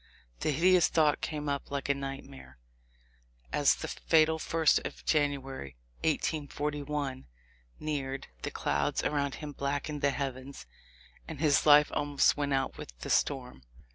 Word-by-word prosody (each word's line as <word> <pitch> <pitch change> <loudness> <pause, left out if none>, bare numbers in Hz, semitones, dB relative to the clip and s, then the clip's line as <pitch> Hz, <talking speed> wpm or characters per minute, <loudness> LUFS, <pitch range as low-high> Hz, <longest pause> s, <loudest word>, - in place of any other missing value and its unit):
The - - -1
hideous 175 +4 +4
thought 155 -3 +2
came 150 -1 -3
up 140 -1 -2
like 140 -1 -3
a 140 - +3
nightmare. 135 0 -8 1.0
As - - +4
the - - -6
"fatal 160 0 +2
first 160 0 +3
of - - -8
January, 135 - -1 0.3
1841," 145 -3 -2 0.5
neared, 135 -3 -3 0.2
the - - -3
clouds 70 0 -1
around 140 -2 0
him 150 -1 -7
blackened 145 +1 -3
the 140 - +3
heavens 135 0 -5 0.6
and 160 -4 -7
his 150 -1 +3
life 150 0 +7
almost 145 -1 +2
went 145 -1 -2
out 135 -1 0
with - - -9
the - - -4
storm. 125 - 0
145 Hz, 140 wpm, -30 LUFS, 135-150 Hz, 1.0 s, life